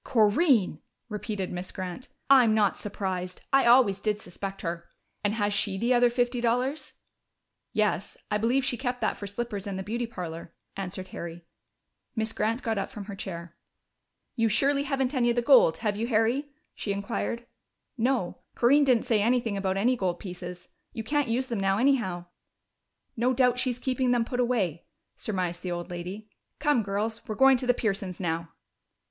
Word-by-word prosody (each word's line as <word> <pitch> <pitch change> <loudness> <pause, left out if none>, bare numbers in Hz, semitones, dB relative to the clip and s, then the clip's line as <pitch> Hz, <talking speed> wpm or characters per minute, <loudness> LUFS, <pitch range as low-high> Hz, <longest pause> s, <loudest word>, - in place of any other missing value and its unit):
"Corinne!" 220 - +3 0.3
repeated 210 -2 -4
Miss 180 +1 -5
Grant. 185 +6 -6 0.2
"I'm 250 -5 +6
not 210 -3 +3
surprised. 185 -3 -4
I 270 -2 +5
always 235 -5 +6
did 210 0 -1
suspect 195 +2 -7
her.... 170 0 -4 0.3
And 205 +1 +1
has 205 -2 0
she 200 -1 0
the 235 +5 +2
other 245 0 +5
fifty 245 0 0
dollars?" 250 +5 0 0.8
"Yes, 210 -3 0
I 210 - +2
believe 250 +5 +2
she 245 - 0
kept 250 -1 -2
that - - +1
for 200 - -7
slippers 205 -1 -4
and 195 -1 -3
the 190 - -4
beauty 235 +4 -2
parlor," 170 -6 -7 0.2
answered 185 -1 -5
Harry. 170 0 -7 0.7
Miss 220 -1 -1
Grant 225 +4 -1
got 225 -3 0
up 195 - -3
from 205 -2 -8
her 200 -1 -7
chair. 170 -3 -7 0.8
"You 225 -1 +2
surely 280 +6 +2
haven't 270 -1 0
any 245 -3 +2
of 235 - +2
the 240 - +1
gold, 240 - +6
have 210 -1 +1
you, 225 +3 -2
Harry?" 240 +5 +1 0.2
she 205 - -3
inquired. 230 +4 -3 0.5
"No. 245 -6 0 0.2
Corinne 280 +5 +5
didn't 250 -4 +3
say 225 -5 +2
anything 235 -1 +1
about 195 -1 -1
any 245 +6 +3
gold 185 -6 -1
pieces. 180 -1 -8 0.2
You 225 - -4
can't 290 +3 +1
use 240 +3 0
them 235 -5 -3
now, 195 0 +2
anyhow." 225 -9 +1 0.9
"No 245 +3 +2
doubt 250 -1 +3
she's 250 -2 0
keeping 255 0 0
them 240 -1 +2
put 245 +1 -3
away," 210 -10 0 0.3
surmised 180 -4 -2
the 180 - -4
old 175 +1 -4
lady. 180 +5 -6 0.3
"Come, 295 -5 +2
girls! 215 +3 -2
We're 215 - -3
going 265 +1 +6
to 250 - -3
the 245 - +4
Pearsons' 195 -5 -2
now." 165 -2 -2
220 Hz, 175 wpm, -28 LUFS, 190-245 Hz, 0.9 s, I'm